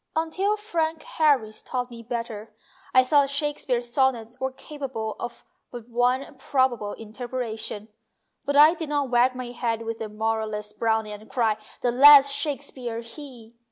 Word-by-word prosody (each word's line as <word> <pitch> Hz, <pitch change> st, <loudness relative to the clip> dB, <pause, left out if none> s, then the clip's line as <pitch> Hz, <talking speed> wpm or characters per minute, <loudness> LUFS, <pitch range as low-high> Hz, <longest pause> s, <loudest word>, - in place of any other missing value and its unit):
Until 370 Hz, +6 st, 0 dB
Frank 330 Hz, -6 st, -2 dB
Harris 275 Hz, -9 st, +1 dB
taught 250 Hz, -1 st, -4 dB
me 235 Hz, -1 st, -9 dB
better 225 Hz, -2 st, -6 dB, 0.4 s
I 255 Hz, -, +6 dB
thought 280 Hz, +1 st, +3 dB
Shakespeare's 275 Hz, -4 st, -2 dB
Sonnets 250 Hz, -3 st, 0 dB
were 265 Hz, 0 st, -2 dB
capable 260 Hz, -6 st, -6 dB
of 240 Hz, 0 st, -7 dB, 0.2 s
but 240 Hz, -2 st, -9 dB
one 245 Hz, +3 st, +1 dB
probable 255 Hz, -7 st, 0 dB
interpretation; 225 Hz, -2 st, -6 dB, 0.6 s
but 285 Hz, -, -2 dB
I 300 Hz, +3 st, +8 dB
did 320 Hz, -3 st, -6 dB
not 285 Hz, -3 st, -1 dB
wag 250 Hz, +1 st, +3 dB
my 250 Hz, -1 st, -6 dB
head 230 Hz, -2 st, -2 dB
with 225 Hz, 0 st, -5 dB
the 220 Hz, -, -5 dB
moralist 215 Hz, -1 st, -3 dB
Browning 220 Hz, -2 st, 0 dB
and 210 Hz, +1 st, -11 dB
cry, 225 Hz, -4 st, +1 dB, 0.2 s
"The 245 Hz, -, +1 dB
less 280 Hz, +2 st, +8 dB
Shakespeare 275 Hz, -5 st, -3 dB
he 235 Hz, -2 st, -12 dB
245 Hz, 150 wpm, -25 LUFS, 225-280 Hz, 0.6 s, I